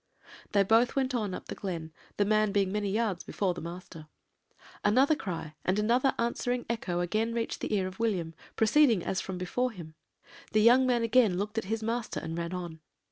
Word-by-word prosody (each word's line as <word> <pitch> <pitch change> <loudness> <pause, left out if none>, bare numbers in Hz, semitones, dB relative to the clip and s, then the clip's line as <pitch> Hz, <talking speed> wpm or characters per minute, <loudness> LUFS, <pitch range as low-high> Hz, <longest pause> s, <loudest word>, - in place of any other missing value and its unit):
"They 200 -1 +5
both 225 +5 +3
went 265 -1 0
on 210 -6 -1
up - - -8
the - - -6
glen, 165 -5 -5 0.2
the 205 - +3
man 215 0 +2
being 195 -2 +1
many 205 0 -1
yards 205 -3 -1
before 190 -3 -1
the - - -8
master. 170 -1 -9 0.8
Another 260 +9 +4
cry 165 - -5
and 185 +2 +1
another 240 +5 +2
answering 245 +1 -1
echo 185 -7 -2
again 220 +6 -1
reached 230 -1 -2
the - - -3
ear 190 -2 +1
of 185 +2 -7
William, 185 -8 -1 0.2
proceeding 225 - +4
as 190 - -1
from 190 -1 -5
before 215 +8 -1
him. 170 -7 -10 0.6
The 215 - +4
young 250 +3 +6
man 240 -2 +2
again 230 -5 +3
looked 210 +3 -2
at - - -7
his 220 +2 -2
master 230 +1 -2
and 165 0 -5
ran 170 0 -3
on. 175 -3 -6
210 Hz, 195 wpm, -29 LUFS, 180-230 Hz, 0.8 s, young